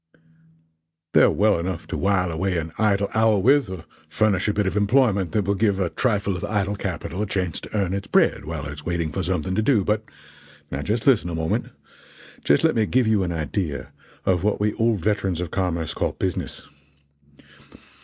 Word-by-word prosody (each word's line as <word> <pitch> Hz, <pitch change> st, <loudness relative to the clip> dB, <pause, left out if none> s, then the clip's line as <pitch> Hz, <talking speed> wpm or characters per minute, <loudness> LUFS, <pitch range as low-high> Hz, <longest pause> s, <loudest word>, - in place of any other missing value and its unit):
They're -, -, +6 dB
well 105 Hz, -3 st, +2 dB
enough 85 Hz, -1 st, -4 dB
to -, -, -3 dB
while 95 Hz, -2 st, +1 dB
away 90 Hz, +3 st, -1 dB
an 80 Hz, -1 st, -3 dB
idle 100 Hz, -2 st, +2 dB
hour 110 Hz, -1 st, +3 dB
with, 135 Hz, +3 st, +3 dB
or 95 Hz, -4 st, -7 dB, 0.2 s
furnish 105 Hz, -3 st, +1 dB
a 105 Hz, -, +1 dB
bit 105 Hz, 0 st, 0 dB
of 95 Hz, -, -1 dB
employment 105 Hz, -3 st, +2 dB
that 105 Hz, -3 st, +1 dB
will 100 Hz, -, +1 dB
give 100 Hz, -1 st, +1 dB
a 90 Hz, -3 st, -1 dB
trifle 100 Hz, -5 st, 0 dB
of 90 Hz, -, -6 dB
idle 100 Hz, -1 st, -1 dB
capital 95 Hz, -1 st, -4 dB
a 105 Hz, -, -1 dB
chance 90 Hz, -4 st, -2 dB
to -, -, -5 dB
earn 95 Hz, -2 st, 0 dB
its 100 Hz, 0 st, -4 dB
bread -, -, +2 dB
while 75 Hz, -2 st, -5 dB
it 70 Hz, -, -5 dB
is 75 Hz, 0 st, -9 dB
waiting 85 Hz, -2 st, -2 dB
for 95 Hz, -, -2 dB
something 90 Hz, 0 st, -1 dB
to 105 Hz, -, +1 dB
do, 110 Hz, -3 st, +3 dB
but 105 Hz, +2 st, 0 dB, 0.7 s
now 70 Hz, -, -3 dB
just 110 Hz, +9 st, -2 dB
listen 120 Hz, -10 st, +4 dB
a 85 Hz, -, -3 dB
moment 80 Hz, 0 st, -1 dB, 0.8 s
just 70 Hz, -, +3 dB
let -, -, +4 dB
me 110 Hz, -2 st, +1 dB
give 130 Hz, -1 st, +2 dB
you 110 Hz, -2 st, +2 dB
an 90 Hz, -2 st, -1 dB
idea 80 Hz, 0 st, -3 dB, 0.3 s
of 90 Hz, -1 st, +1 dB
what 105 Hz, 0 st, +1 dB
we 105 Hz, 0 st, +1 dB
old 115 Hz, -4 st, +1 dB
veterans 95 Hz, -3 st, 0 dB
of 90 Hz, -2 st, -4 dB
commerce 85 Hz, -4 st, -1 dB
call -, -, -1 dB
'business.' 95 Hz, -3 st, -4 dB
95 Hz, 200 wpm, -23 LUFS, 85-105 Hz, 0.8 s, They're